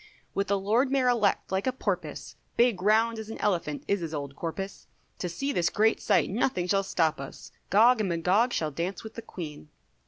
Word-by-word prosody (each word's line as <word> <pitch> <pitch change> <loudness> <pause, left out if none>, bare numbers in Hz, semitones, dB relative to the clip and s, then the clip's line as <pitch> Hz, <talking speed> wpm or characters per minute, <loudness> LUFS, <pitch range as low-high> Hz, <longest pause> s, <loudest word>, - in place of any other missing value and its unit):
With 200 - 0
the 200 - +2
Lord 220 +7 +2
Mayor 265 -2 +3
Elect 215 -7 +1
like 190 +5 0
a - - +3
porpoise, 260 - -4 0.2
Big 235 -6 +3
round 220 +3 +3
as 220 0 -7
an 225 - -6
elephant 170 -7 -1
is 200 - +1
his 165 -2 -4
old 140 -1 -5
corpus, 195 +5 -5 0.3
To 180 - -2
see 275 +11 -2
this 175 -10 +1
great 220 +1 +2
sight 200 - +3
nothing 195 -3 0
shall 195 +1 +3
stop 160 -5 0
us, 140 - -9 0.2
Gog 230 +4 +6
and 205 -3 0
Magog 185 +8 +2
shall 155 -7 -1
dance 175 +5 -3
with 220 - -9
the 230 - -7
Queen. 155 -8 -8
200 Hz, 205 wpm, -28 LUFS, 170-225 Hz, 0.3 s, Gog